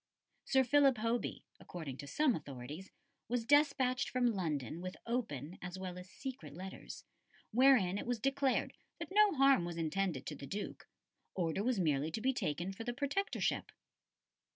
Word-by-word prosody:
Sir 265 -1 +4
Philip 275 0 +5
Hoby, 230 +1 -1 0.2
according 155 -7 -7
to 145 - -8
some 295 - +3
authorities, 145 - -7 0.4
was 235 0 -1
despatched 275 -2 +3
from 250 -1 +1
London 155 - -2
with 185 0 -6
open, 185 - -3
as 180 +1 -6
well 185 -1 -5
as 180 +1 -11
secret, 255 - -7
letters, 190 +2 -8 0.5
wherein 225 -6 +5
it - - -6
was 245 -2 0
declared 275 +2 +1 0.2
that - - -6
no 415 -2 +5
harm 275 -7 +5
was 170 -1 -4
intended 165 -3 -1
to 150 - -4
the 140 - -9
Duke; 205 +8 -5 0.5
order 175 +1 0
was 245 -3 +1
merely 150 -3 +1
to - - -1
be 265 +3 +2
taken 175 - -2
for 225 - -7
the 240 +1 -2
Protectorship. 290 +9 -1
200 Hz, 160 wpm, -35 LUFS, 165-260 Hz, 0.5 s, Philip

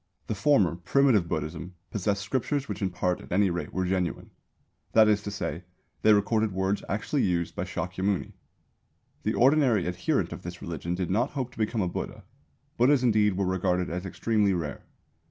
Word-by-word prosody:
The - - -2
former, 105 - +3
Primitive 110 0 +3
Buddhism, 80 +3 -4 0.2
possessed 100 0 -1
scriptures 135 +5 -1
which - - -5
in 95 - +1
part 90 0 -1
at - - -14
any 95 +1 +3
rate 85 0 -4
were 95 0 -1
genuine; 90 -3 -2 0.6
that 110 -1 +7
is 105 -1 +3
to 105 - -5
say, 90 -4 -4 0.4
they 110 - +5
recorded 105 0 +2
words 95 +2 0
actually 110 +8 -1
used 85 -2 0
by 90 - -2
Shākyamuni. 95 +2 -2 0.9
The - - -1
ordinary 130 - +4
adherent 90 0 -1
of - - -8
this 90 0 -7
religion 85 +1 -4
did 90 -1 -2
not 120 +7 +2
hope 130 -3 -3
to - - -19
become 110 0 0
a - - 0
Buddha; 105 +3 -5 0.5
Buddhas 130 +2 +4
indeed 105 -5 +3
were 100 - +1
regarded 90 -1 0
as 90 +2 -4
extremely 105 0 +1
rare. 75 -6 -5
95 Hz, 175 wpm, -27 LUFS, 90-110 Hz, 0.9 s, that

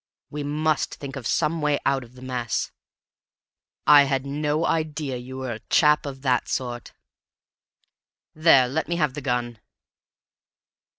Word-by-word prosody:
We 150 - -4
must 150 +1 -1
think 140 -1 -8
of 130 -4 -5
some 160 +6 0
way 150 -1 +2
out 135 -1 +1
of 120 +1 -17
the 130 - -12
mess. 125 -3 -2 1.1
I 145 -1 +8
had 135 -1 -1
no 150 +3 -1
idea 155 -4 -1
you 130 +2 -8
were 130 -2 -4
a 110 - -5
chap 150 -1 +4
of 135 -1 -8
that 130 -2 +1
sort! 120 -2 -4 1.4
There, 155 -5 +5
let 155 +6 -2
me 170 - -1
have 150 -6 0
the 145 - -6
gun." 120 -3 -2
140 Hz, 145 wpm, -24 LUFS, 125-150 Hz, 1.4 s, I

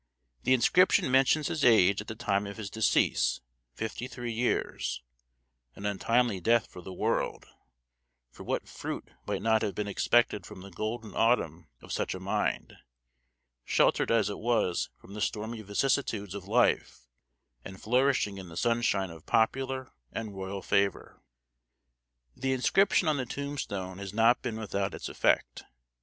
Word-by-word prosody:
The 130 - +5
inscription 130 +3 +4
mentions 135 +3 +4
his 155 -3 -2
age 100 -4 +5
at 105 - -11
the 110 - -5
time 100 -1 0
of 100 - -8
his 105 -2 -6
decease, 110 0 +2 0.4
fifty 110 +2 -4
three 120 -2 -5
years 110 - -1 0.7
an 100 - -8
untimely 115 +1 +1
death 115 +5 +3
for 90 - -12
the 95 - -9
world, 90 - -1 0.9
for - - -11
what - - -2
fruit - - -6 0.2
might 100 - -2
not 110 -1 +3
have 100 - -2
been 105 - -2
expected 105 0 +2
from 90 - -11
the 100 +1 -11
golden 110 +4 -4
autumn 90 -8 +1 0.2
of - - -10
such - - -1
a - - -6
mind, 100 +3 -2 0.9
sheltered - - +2
as 115 -3 +3
it 100 - -4
was 110 -6 +1
from 100 - -14
the 105 - -6
stormy 110 +2 -2
vicissitudes 105 -1 -1
of 100 -2 -7
life, 115 - +2 0.6
and 95 -1 -9
flourishing 125 -4 +1
in 95 -2 -9
the 80 - -10
sunshine 115 -5 +1
of 80 -2 -13
popular 130 +3 0 0.2
and 110 -3 -5
royal 95 0 -5
favor? 100 0 0 1.1
The 135 0 -1
inscription 170 +8 +3
on 155 -2 +2
the 130 -2 -3
tombstone 100 -10 -4
has 100 0 -7
not 115 +2 +4
been 120 -4 -3
without 100 -3 -2
its - - -6
effect. - - +1
110 Hz, 155 wpm, -29 LUFS, 100-120 Hz, 1.1 s, The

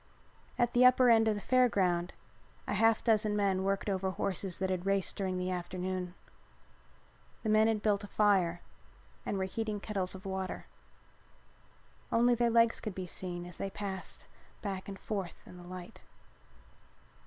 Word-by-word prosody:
At 240 -1 +2
the 245 - +5
upper 250 -1 +7
end 225 -1 +5
of 215 - +2
the 205 - -5
Fair 255 +2 +4
Ground 180 -4 0 0.5
a - - -2
half 225 +2 +3
dozen 215 -2 +2
men 195 -2 +1
worked 195 +1 -1
over 190 -1 0
horses 190 0 -2
that 190 0 -1
had 185 0 -2
raced 195 -1 +1
during 190 -2 -2
the 180 0 -2
afternoon. 180 0 -3 1.3
The 220 - -1
men 215 +1 +5
had 220 -2 0
built 205 -1 +2
a - - -6
fire 190 -5 +2 0.6
and 200 - -1
were 190 - 0
heating 210 +2 -3
kettles 195 -3 -3
of 190 +1 -11
water. 190 -1 -4 1.5
Only 240 +1 +4
their 240 0 +2
legs 230 0 +4
could 210 -4 -5
be 185 - -4
seen 175 0 -5
as 180 - -10
they 195 - -2
passed 195 -1 -6 0.4
back 195 -2 -4
and 195 -1 -6
forth 195 -5 -4
in 180 - -12
the 175 - -11
light. 180 0 -9
195 Hz, 165 wpm, -32 LUFS, 185-215 Hz, 1.5 s, upper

